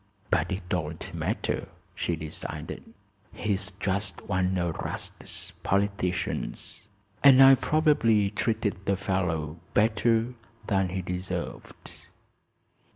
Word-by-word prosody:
"But 90 Hz, +1 st, +2 dB
it 95 Hz, -1 st, -4 dB
don't 80 Hz, -3 st, -3 dB
matter," -, -, -2 dB, 0.3 s
she 85 Hz, -, -1 dB
decided. 80 Hz, -1 st, -6 dB, 0.5 s
"He's 100 Hz, -2 st, 0 dB
just 100 Hz, -1 st, -1 dB
one 95 Hz, 0 st, 0 dB
o' 85 Hz, -1 st, 0 dB
'Rast's -, -, -5 dB
politicians, 100 Hz, 0 st, -2 dB, 0.4 s
and 135 Hz, -2 st, +9 dB
I 135 Hz, 0 st, +10 dB
probably 125 Hz, -9 st, +3 dB
treated 105 Hz, -3 st, -1 dB
the 100 Hz, -1 st, +2 dB
fellow 90 Hz, -5 st, -1 dB, 0.2 s
better 115 Hz, +2 st, +3 dB, 0.3 s
than 95 Hz, -3 st, +1 dB
he 95 Hz, +1 st, -3 dB
deserved." 90 Hz, +1 st, -6 dB
95 Hz, 100 wpm, -27 LUFS, 90-110 Hz, 0.5 s, I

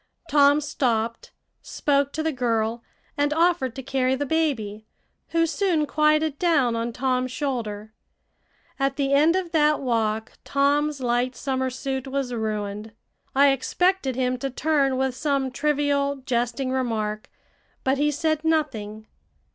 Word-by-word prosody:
Tom 285 Hz, 0 st, +5 dB
stopped, 230 Hz, -5 st, -1 dB, 0.3 s
spoke 280 Hz, -1 st, 0 dB
to 315 Hz, -, -3 dB
the 320 Hz, -, 0 dB
girl, 230 Hz, -3 st, -1 dB, 0.4 s
and 290 Hz, 0 st, +2 dB
offered 330 Hz, -7 st, +2 dB
to 265 Hz, -, -6 dB
carry 260 Hz, 0 st, +1 dB
the 285 Hz, +2 st, -2 dB
baby, 230 Hz, -9 st, -1 dB, 0.4 s
who 330 Hz, 0 st, +2 dB
soon 335 Hz, -2 st, +1 dB
quieted 305 Hz, 0 st, +2 dB
down 285 Hz, -9 st, +2 dB
on 230 Hz, +1 st, -2 dB
Tom's 255 Hz, +1 st, -1 dB
shoulder. 220 Hz, -7 st, -4 dB, 0.9 s
At 275 Hz, 0 st, +1 dB
the 275 Hz, -1 st, 0 dB
end 305 Hz, +5 st, +4 dB
of 370 Hz, -3 st, -2 dB
that 300 Hz, -2 st, +3 dB
walk 220 Hz, -4 st, -1 dB
Tom's 285 Hz, +1 st, +1 dB
light 245 Hz, +1 st, 0 dB
summer 260 Hz, -1 st, -1 dB
suit 265 Hz, +1 st, -4 dB
was 265 Hz, -2 st, -2 dB
ruined. 215 Hz, -1 st, -3 dB, 0.4 s
I 280 Hz, +1 st, +6 dB
expected 285 Hz, +1 st, 0 dB
him 255 Hz, 0 st, 0 dB
to 275 Hz, -, -2 dB
turn 275 Hz, -1 st, +1 dB
with 265 Hz, -1 st, 0 dB
some 275 Hz, -1 st, -1 dB
trivial, 280 Hz, -1 st, 0 dB
jesting 245 Hz, +1 st, -1 dB
remark, 220 Hz, -5 st, -2 dB, 0.5 s
but 265 Hz, +1 st, +1 dB
he 295 Hz, +1 st, +3 dB
said 310 Hz, +1 st, -1 dB
nothing. 225 Hz, -10 st, -1 dB
270 Hz, 140 wpm, -24 LUFS, 240-295 Hz, 0.9 s, I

